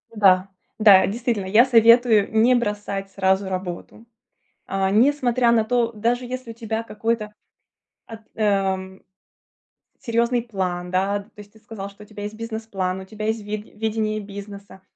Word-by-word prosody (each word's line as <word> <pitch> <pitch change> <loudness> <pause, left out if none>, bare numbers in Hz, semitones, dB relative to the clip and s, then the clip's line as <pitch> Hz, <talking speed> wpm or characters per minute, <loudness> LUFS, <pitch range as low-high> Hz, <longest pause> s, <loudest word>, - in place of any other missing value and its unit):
Да, 190 -3 +4 0.3
да. 200 -3 +7
Действительно, 225 -1 -2
я 215 +6 +5
советую 230 -3 +5
не 225 +3 +4
бросать 205 -4 -3
сразу 190 0 +1
работу, 185 +4 -6 0.6
а, 195 0 -1
не 225 +8 +4
смотря 250 -4 +1
на 230 -2 +3
то 235 0 0
даже, 235 +3 -1
если 255 -1 -6
у - - -9
тебя 225 -1 -4
какой-то 225 -1 -3 0.7
ат 225 -1 -10 0.2
ам 190 -3 -1 1.0
серьезный 235 +1 0
план, 180 -5 -4
да. 195 +2 0
То 200 - -20
есть 205 0 -13
ты 220 - -19
сказал, 215 -3 -8
что 200 +1 -15
у - - -14
тебя 210 -1 -9
есть 210 +1 -6
бизнес-план, 220 -5 -4
у - - -10
тебя 215 +2 -7
есть 220 0 -1
ви 210 +1 -4
видение 215 0 -3
бизнеса. 200 -1 -10
215 Hz, 155 wpm, -22 LUFS, 195-230 Hz, 1.0 s, да